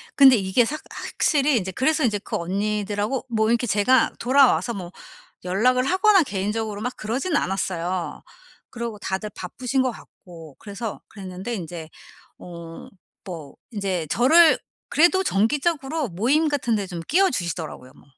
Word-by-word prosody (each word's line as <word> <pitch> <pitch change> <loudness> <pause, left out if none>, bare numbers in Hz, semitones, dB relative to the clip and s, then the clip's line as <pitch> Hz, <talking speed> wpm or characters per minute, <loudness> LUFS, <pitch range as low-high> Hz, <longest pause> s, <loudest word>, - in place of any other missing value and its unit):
근데 270 -2 +8
이게 200 +3 +2
삭 305 +5 -4
확실히 285 -3 +1
인제 190 -3 -2
그래서 305 - +1
인제 210 -4 +1
그 - - -6
언니들하고 205 +5 -2
뭐 220 -2 +1
이렇게 235 +1 +1
제가 215 +5 +3
돌아와서 255 -1 +3
뭐 180 -4 -7 0.5
연락을 250 +8 +2
하거나 380 +3 +4
개인적으로 210 -2 -3
막 250 +2 -3
그러진 260 +10 -2
않았어요. 185 -2 -2 0.5
그러고 235 -3 -6
다들 190 +1 -3
바쁘신 250 +8 -2
것 255 - +1
같고 165 - -14
그래서 210 +1 -6
그랬는데 190 +3 -7
인제 165 -4 -7 0.5
어 170 -2 -10 0.4
뭐 160 -6 -8 0.2
인제 190 -6 -2
저를 315 +7 +6 0.3
그래도 350 +4 +4
정기적으로 295 - 0
모임 245 - +1
같은 270 -6 0
데 200 -2 -3
좀 175 -3 -6
끼워주시더라고요. 175 - 0
뭐 - - -19
220 Hz, 330 characters per minute, -23 LUFS, 190-265 Hz, 0.5 s, 근데